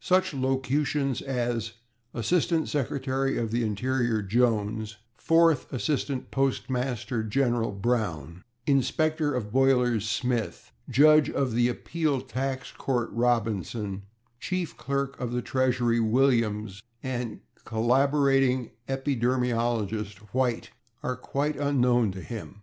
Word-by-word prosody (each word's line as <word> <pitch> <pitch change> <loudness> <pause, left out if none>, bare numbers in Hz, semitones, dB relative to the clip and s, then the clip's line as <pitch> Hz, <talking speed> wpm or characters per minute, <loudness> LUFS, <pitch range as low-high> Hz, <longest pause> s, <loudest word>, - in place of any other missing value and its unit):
Such 185 -1 +2
locutions 135 +1 0
as 120 -4 -2 0.4
/Assistant 165 +6 +1
Secretary 135 -1 -1
of 115 -2 -2
the 120 +1 0
Interior/ 115 +1 0
Jones, 110 -1 0 0.2
/Fourth 165 -3 +3
Assistant 135 0 -2
Postmaster 130 -3 -1
General/ 120 0 +1
Brown, 95 - -2 0.2
/Inspector 145 +2 +1
of 105 -4 -4
Boilers/ 125 -4 +3
Smith, 120 - -2 0.2
/Judge 150 +4 +5
of 130 -4 0
the 120 +1 +3
Appeal 150 +2 -1
Tax 130 +1 -4
Court/ 120 -3 -2
Robinson, 110 -4 -1 0.4
/Chief 185 -3 -3
Clerk 140 0 -3
of 120 -1 -3
the 125 -1 -1
Treasury/ 125 -3 +1
Williams 110 -4 +1 0.2
and 125 -3 -4 0.2
/Collaborating 135 +1 +2 0.2
Epidermologist/ 120 -5 0 0.2
White 125 -2 0 0.3
are 130 - -1
quite 140 +4 -2
unknown 125 -6 +2
to 95 0 -7
him. 110 -3 -8
125 Hz, 105 wpm, -27 LUFS, 115-135 Hz, 0.4 s, Judge